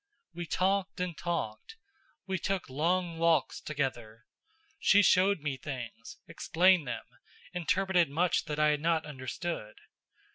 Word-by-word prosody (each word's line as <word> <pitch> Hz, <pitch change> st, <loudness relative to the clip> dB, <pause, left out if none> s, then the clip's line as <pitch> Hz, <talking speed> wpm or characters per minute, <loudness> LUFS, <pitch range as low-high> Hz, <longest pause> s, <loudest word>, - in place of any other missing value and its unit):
We 170 Hz, 0 st, -6 dB
talked 195 Hz, +2 st, 0 dB
and 180 Hz, -2 st, -2 dB
talked. 170 Hz, -, -4 dB, 0.5 s
We 190 Hz, -1 st, -2 dB
took 195 Hz, -7 st, -2 dB
long 170 Hz, +4 st, 0 dB
walks 165 Hz, -4 st, +2 dB
together. 120 Hz, -7 st, -4 dB, 0.5 s
She 205 Hz, -8 st, +5 dB
showed 185 Hz, -1 st, +4 dB
me 145 Hz, -3 st, -2 dB
things, 120 Hz, -4 st, -7 dB
explained 180 Hz, -3 st, +3 dB
them, -, -, -4 dB, 0.5 s
interpreted 180 Hz, -1 st, +2 dB
much 170 Hz, +4 st, +1 dB
that 150 Hz, -, -4 dB
I 150 Hz, 0 st, +4 dB
had 150 Hz, -1 st, +1 dB
not 165 Hz, 0 st, +1 dB
understood. 130 Hz, -3 st, -5 dB
165 Hz, 130 wpm, -30 LUFS, 140-180 Hz, 0.5 s, She